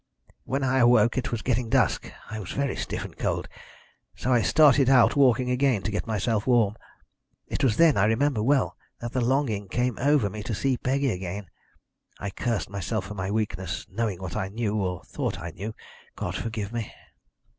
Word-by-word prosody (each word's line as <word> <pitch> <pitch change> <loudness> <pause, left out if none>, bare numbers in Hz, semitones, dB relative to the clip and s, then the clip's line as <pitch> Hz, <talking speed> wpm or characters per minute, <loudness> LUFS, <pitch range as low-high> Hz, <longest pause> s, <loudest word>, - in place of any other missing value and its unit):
"When 135 +1 -1
I 130 0 +2
awoke 120 -2 +5
it 125 - -4
was 115 -3 -3
getting 125 -2 0
dusk. - - +1 0.2
I 110 - -4
was 95 -4 -6
very 140 -2 -1
stiff - - -4
and - - -11
cold, - - -2 0.7
so 130 - 0
I 120 - +4
started 140 -1 +5
out 130 -3 +5
walking 125 -3 +4
again 125 -6 +2
to 105 - -2
get 105 - -3
myself 110 0 0
warm. 115 -5 +3 0.7
It 145 - -3
was 115 -5 +3
then, 165 -6 +5
I 100 - +4
remember 115 +2 +2
well, 135 +4 +2 0.2
that 120 0 -5
the 130 - 0
longing 120 -5 0
came 125 +4 -1
over 145 -5 +3
me 105 +2 -6
to 110 0 -3
see 135 +5 +1
Peggy 135 +2 0
again. 95 -1 -5 0.7
I 100 - -5
cursed 115 -2 -2
myself 100 +1 -2
for 100 - -7
my 95 -1 -3
weakness, 105 -3 -2
knowing 105 -3 -2
what 90 -2 -5
I 95 - -2
knew 105 0 -2
or 95 -4 -2
thought - - -3
I 85 0 -6
knew, 105 +7 -6 0.4
God - - -4
forgive 110 -1 -4
me. 115 -2 -4
115 Hz, 190 wpm, -26 LUFS, 100-130 Hz, 0.7 s, awoke